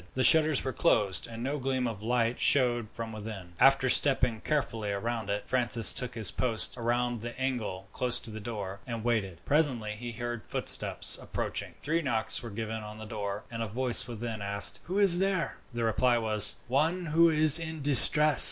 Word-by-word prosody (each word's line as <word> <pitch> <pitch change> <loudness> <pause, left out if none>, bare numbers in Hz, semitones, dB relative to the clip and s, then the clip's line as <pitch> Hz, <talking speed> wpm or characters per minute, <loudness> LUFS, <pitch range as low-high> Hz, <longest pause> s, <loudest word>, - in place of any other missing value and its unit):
The 130 - -1
shutters 155 +2 +5
were 130 - -4
closed, 100 -5 0
and 115 0 -9
no 140 +3 -3
gleam 130 -1 -2
of 110 -4 -7
light 115 +1 -1
showed 120 -5 +2
from 115 0 -8
within. 105 -5 -9
After 135 -1 +3
stepping 125 -4 +1
carefully 115 -8 -3
round 110 +1 -5
it, 100 0 -4
Francis 120 -3 +3
took 125 -1 -1
his 110 -6 +2
post 115 -4 -1
round 120 -1 -2
the 120 +2 -9
angle 120 -8 -4
close 125 -1 0
to 115 - -10
the 110 - -8
door, 100 -3 -7
and 115 -2 -6
waited. 100 -8 -3
Presently 135 -8 0
he 120 +2 -8
heard 120 0 -6
footsteps - - -1
approaching - - -5
three 165 +3 -2
knocks 120 -7 -1
were 120 - -9
given 110 +1 -6
on 105 0 -10
the 110 - -10
door, 105 -2 -6
and 115 -1 -6
a 115 - -3
voice 120 +4 +1
within 115 -2 -7
asked, 100 0 +2
"Who 185 +3 -4
is 195 -4 +6
there?" 190 -6 -2
The 120 -1 -4
reply 120 +2 +1
was, 110 -2 +5
"One 160 +8 -1
who 165 +2 +3
is 155 0 +8
in 160 -2 -7
distress." 145 +1 +4
120 Hz, 190 wpm, -28 LUFS, 110-135 Hz, -, is